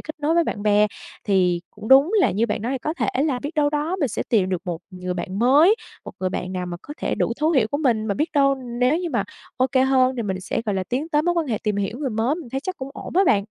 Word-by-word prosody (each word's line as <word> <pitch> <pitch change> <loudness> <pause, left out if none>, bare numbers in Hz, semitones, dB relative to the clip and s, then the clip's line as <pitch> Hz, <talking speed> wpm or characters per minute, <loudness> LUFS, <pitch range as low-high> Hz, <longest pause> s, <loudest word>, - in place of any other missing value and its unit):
kết 310 - -8
nối 310 +3 +1
với 340 -1 +3
bạn 205 - -4
bè. 210 0 +4 0.4
Thì 180 -4 +2
cũng 210 +1 -9
đúng 275 +8 +6
là - - +4
như 220 +5 +1
bạn 210 -1 -3
nói, 260 +3 -2
có 310 +5 -3
thể - - -1 0.2
là 275 -5 0
biết 290 +6 -6
đâu 290 -1 +2
đó 305 +5 -1
mình 280 - +2
sẽ - - -3
tìm 200 -5 +2
được 185 -1 -2
một 175 -3 -3
người 180 0 -5
bạn 185 +2 -4
mới, 290 - +5 0.3
một - - -8
người 185 - 0
bạn 185 0 -4
nào 180 -1 -3
mà 175 - -5
có 295 - -9
thể - - -1
đủ - - 0
thấu 310 - +3
hiểu 260 -9 +3
của 285 - -1
mình, 230 -7 +1
mà 200 - 0
biết 305 +7 0
đâu 275 -2 +4
nếu 250 +3 0
như 350 -2 -3
mà 235 - 0 0.3
OK 255 +1 +1 0.2
hơn 260 -1 +3
thì 235 - -1
mình 190 -2 -3
sẽ, 205 - -3
gọi 205 - 0
là, 190 -1 -1
tiến 275 +6 -2
tới 300 -1 +2
mối 350 +1 +1
quan 330 -3 0
hệ 220 -4 -1
tìm 210 -2 -1
hiểu 205 +5 -2
người 275 -4 -2
mới, 225 +7 0
mình 320 -8 -8
thấy 270 +2 -2
chắc 370 +4 -5
cũng 265 +1 -7
ổn - - -8
á 385 - +6
bạn. 200 -7 +3
250 Hz, 295 wpm, -22 LUFS, 205-295 Hz, 0.4 s, đúng